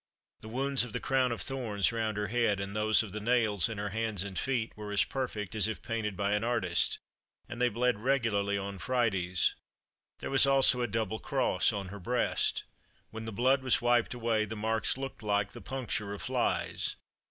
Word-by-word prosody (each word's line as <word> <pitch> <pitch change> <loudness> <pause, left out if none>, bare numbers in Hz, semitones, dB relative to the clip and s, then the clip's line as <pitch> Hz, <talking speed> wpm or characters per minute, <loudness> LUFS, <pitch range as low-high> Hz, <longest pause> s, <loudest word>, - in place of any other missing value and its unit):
The 110 - -8
wounds 135 +3 +1
of 120 -4 -7
the - - -1
crown 130 -2 +1
of 115 - -3
thorns 115 -8 +1
round 110 -2 -2
her 105 -2 -2
head, 115 -3 +1
and 100 +1 -5
those 110 +1 +3
of 105 - -8
the 110 - -4
nails 110 -5 +2
in 110 - -5
her 105 0 -2
hands 110 -2 -1
and 100 -2 -7
feet, 120 -2 -1
were 105 -1 -7
as 105 - +4
perfect 115 -7 -4
as 110 -2 +3
if 110 - -5
painted 110 -4 -3
by 100 0 0
an 105 +1 +1
artist, 115 -8 +1 0.5
and 120 - -6
they 125 - +4
bled 120 -1 +1
regularly 110 -6 +1
on 100 0 -5
Fridays. 95 -8 +1 0.6
There - - -6
was 135 0 +5
also 135 -2 +5
a 120 - +1
double 110 0 -2
cross - - +1
on 100 -2 -4
her 100 +2 -8
breast. 125 +7 +1 0.5
When 110 0 -6
the 110 - -5
blood 130 +5 +3
was 130 -2 +3
wiped 120 0 +2
away, 115 -2 +1
the 110 - -6
marks 110 +3 0
looked 135 -2 -6
like 100 -2 0
the - - -10
puncture 125 -5 -3
of - - -9
flies. - - -1
110 Hz, 200 wpm, -31 LUFS, 100-125 Hz, 0.6 s, was